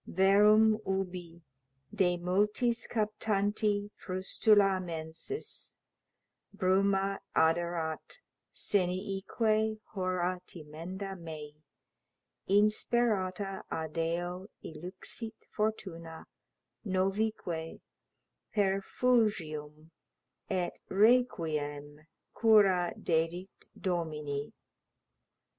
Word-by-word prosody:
Verum 210 +3 +5
ubi, 180 -3 -3 0.5
de 180 -4 +2
multis 210 +6 +1
captanti 210 -1 0
frustula 195 +1 +3
mensis, 165 - -7 0.8
Bruma 195 0 +2 0.2
aderat, 165 - 0 0.3
seniique 205 +3 0
hora 185 -2 -1
timenda 175 +5 -7
mei, 155 -4 -8 1.0
Insperata 205 -2 +1
adeo 170 +3 -2 0.2
illuxit 185 +7 -7
fortuna, 175 -7 -3 0.6
novique 190 -4 -1 0.7
Perfugium 190 -7 0 0.6
et 185 -3 -1
requiem 155 -10 +1 0.3
cura 195 -6 +5
dedit 170 +3 -2
domini. 150 -5 -2
185 Hz, 55 wpm, -31 LUFS, 165-210 Hz, 1.0 s, Verum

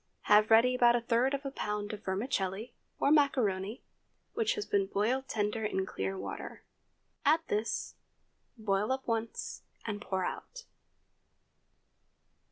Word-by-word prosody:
Have 210 +1 +5
ready 230 +3 +6
about 240 -1 +5
a 240 - +1
third 240 +4 +2
of 280 +1 -7
a 275 - -2
pound 210 -4 -3
of 210 0 -7
vermicelli 200 +2 -2 0.3
(or 280 - +3
macaroni), 230 -8 +2 0.5
which 455 +2 +1
has 420 - -3
been 200 -1 +1
boiled 245 +7 0
tender 210 +1 -1
in 190 -3 0
clear 195 0 -3
water. - - -6 0.6
Add 310 +2 +4
this; 215 +2 -1 0.6
boil 210 0 0
up 265 0 -1
once, 230 -1 -3 0.2
and 205 -2 -3
pour 190 -2 -1
out. - - -6
225 Hz, 135 wpm, -31 LUFS, 205-260 Hz, 0.6 s, ready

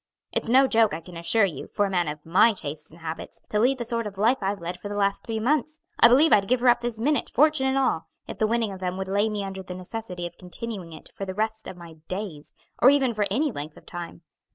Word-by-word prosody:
It's - - -2
no 265 +3 +6
joke, 225 -7 +3
I - - -5
can 175 +1 -12
assure 200 +6 +3
you, 160 -8 -5
for 205 - 0
a - - -2
man 175 -3 +1
of 150 0 -6
my 190 +7 +5
tastes 155 -6 -6
and 170 +2 -16
habits 160 0 -7
to 210 - 0
lead 255 +4 +3
the 240 - -4
sort 230 -1 -1
of 200 -2 -9
life 230 +6 +3
I've 195 +1 -1
led 175 +1 -5
for 205 - -7
the 205 - -4
last 200 -1 +1
three 225 -1 -3
months, 305 +6 0 0.2
I - - +9
believe 280 +7 +5
I'd 200 -1 +4
give 250 +2 +2
her 250 - +5
up 240 0 +5
this 240 -2 -4
minute, 290 +5 +1
fortune 300 -3 +3
and 265 0 +1
all, 255 -11 +1 0.2
if - - -8
the 215 - +3
winning 225 -2 0
of 190 - -8
them 185 0 -3
would 190 0 -4
lay 205 +3 +1
me 210 -1 -3
under 195 -1 -5
the 180 -1 -8
necessity 185 -1 -6
of 175 0 -9
continuing 185 -1 -6
it 160 - -12
for 195 - -5
the 190 -1 -6
rest 220 +1 -2
of 180 - -8
my 170 -2 -12
days, 185 -6 -5 0.3
or 250 - +8
even 270 -4 +3
for 210 -2 0
any 295 +2 +1
length 150 -4 -7
of - - -16
time. 175 -1 -8
205 Hz, 270 wpm, -25 LUFS, 180-235 Hz, 0.3 s, I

